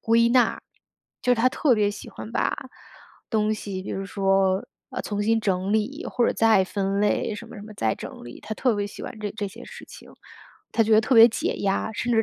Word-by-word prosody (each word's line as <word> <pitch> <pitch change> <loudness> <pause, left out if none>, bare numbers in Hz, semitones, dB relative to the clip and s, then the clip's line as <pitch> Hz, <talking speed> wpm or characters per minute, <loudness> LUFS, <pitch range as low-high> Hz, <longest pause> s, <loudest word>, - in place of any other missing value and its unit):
归 230 +1 +3
纳。 250 0 +3 0.6
就 250 - +1
是 - - +2
她 235 - +3
特 255 -1 +2
别 205 -1 +2
喜 205 - -9
欢 225 - -9
把 - - 0 0.7
东 215 -1 +1
西 195 -3 -6
比 - - -7
如 195 0 -4
说， 195 -1 +1 0.2
呃， - - -4
重新 210 +2 0
整 190 0 0
理 255 +9 -1
或 240 -2 +2
者 - - +1
再 220 -4 +4
分 195 0 -2
类， 210 +1 +1
什 230 +2 -9
么 - - -11
什 205 - -9
么 215 0 -10
再 110 - 0
整 - - -9
理。 120 - -10
她 220 - -6
特 245 -1 +1
别 205 0 -2
喜 - - -10
欢 220 - -7
这 205 -1 -3
这 205 - -2
些 230 +5 -11
事 - - -11
情， - - -14 0.6
她 225 - +3
觉 220 0 +1
得 215 - +7
特 240 +4 +1
别 230 +1 +9
解 225 - -2
压。 200 +2 -1
甚 240 +3 -2
至 225 -1 +4
215 Hz, 250 characters per minute, -24 LUFS, 200-230 Hz, 0.7 s, 别